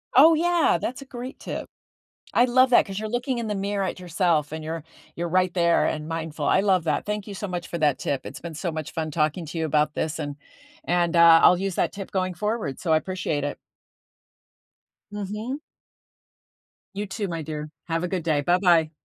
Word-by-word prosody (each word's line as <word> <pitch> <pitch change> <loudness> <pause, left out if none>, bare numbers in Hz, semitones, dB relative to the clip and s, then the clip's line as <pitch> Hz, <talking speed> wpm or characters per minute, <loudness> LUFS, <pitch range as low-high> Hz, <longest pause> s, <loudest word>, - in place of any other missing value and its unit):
Oh 315 +5 +8
yeah, 340 - +3
that's 255 - -3
a - - -9
great 255 +1 -8
tip. - - -5 0.7
I 240 - +5
love 255 +1 +4
that 245 - +5
'cause 195 -1 -7
you're 215 - -4
looking 245 +2 -1
in 230 - -3
the 210 - -2
mirror 200 0 -1
at 185 - -3
yourself 170 -4 0
and 160 0 -5
you're 160 0 -4 0.3
you're 170 0 -2
right 185 +1 +2
there 170 -2 +3
and 155 0 -2
mindful, 165 -1 -4
I 190 - +4
love 185 -4 +2
that, 150 -2 0
thank 210 0 -3
you 205 - -6
so 205 +1 -5
much 175 -2 -4
for 170 - -4
that 150 -3 +2
tip. 140 - -2
It's - - -7
been 170 -1 -7
so 170 +2 -3
much 155 -2 -5
fun 155 -1 -3
talking 155 +2 0
to 165 - -6
you 160 - 0
about 150 0 +1
this 160 +2 -2
and 145 -2 -4 0.5
and, 175 0 +1
uh, 170 -1 +8
I'll 180 - +7
use 195 -2 -2
that - - +1
tip 195 -1 -7
going 185 -1 -1
forward, 210 - -2
so 165 - -1
I - - +6
appreciate 160 -4 -2
it. 145 - -3 1.5
Mhm. 210 +6 -4 1.3
You 205 +1 -3
too, 205 0 -4
my 165 -2 -4
dear. 150 0 -5 0.2
Have 165 0 -1
a - - 0
good 180 -2 -2
day. 155 -3 +1
Bye-bye. 175 -1 +3
175 Hz, 210 wpm, -25 LUFS, 160-205 Hz, 1.5 s, Oh